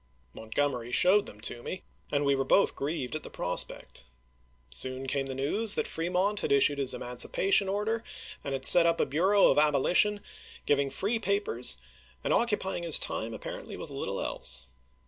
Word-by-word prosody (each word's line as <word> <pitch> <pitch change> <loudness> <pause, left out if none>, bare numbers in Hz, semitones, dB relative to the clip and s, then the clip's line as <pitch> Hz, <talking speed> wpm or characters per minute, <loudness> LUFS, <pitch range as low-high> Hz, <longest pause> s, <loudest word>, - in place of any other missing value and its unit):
Montgomery 120 +1 -3
showed 195 +9 +4
them 105 - -12
to 120 - -3
me, 185 +9 -7 0.3
and 145 0 0
we 140 - +3
were 135 0 0
both 195 +9 +3
grieved 145 -2 -4
at 155 - -4
the - - -9
prospect. 90 -7 -3 0.7
Soon 130 - -1
came 135 0 -2
the 130 - -5
news 200 +11 +3
that - - -1
Fremont 180 +5 -1
had - - -3
issued 140 +1 +3
his 135 -2 +2
emancipation 190 +10 0
order, 215 +3 -2 0.4
and 140 - -4
had 135 0 -3
set 175 -1 +7
up 165 0 +1
a - - +2
bureau 190 +7 +3
of - - +3
abolition, 165 +8 +3 0.4
giving 140 -1 +1
free 200 - -2
papers, 410 - -2 0.5
and - - 0
occupying 210 -6 0
his 170 -3 +6
time 110 +1 -4
apparently 110 - -8
with - - -8
little - - -4
else. 65 +1 0
150 Hz, 170 wpm, -28 LUFS, 135-200 Hz, 0.7 s, set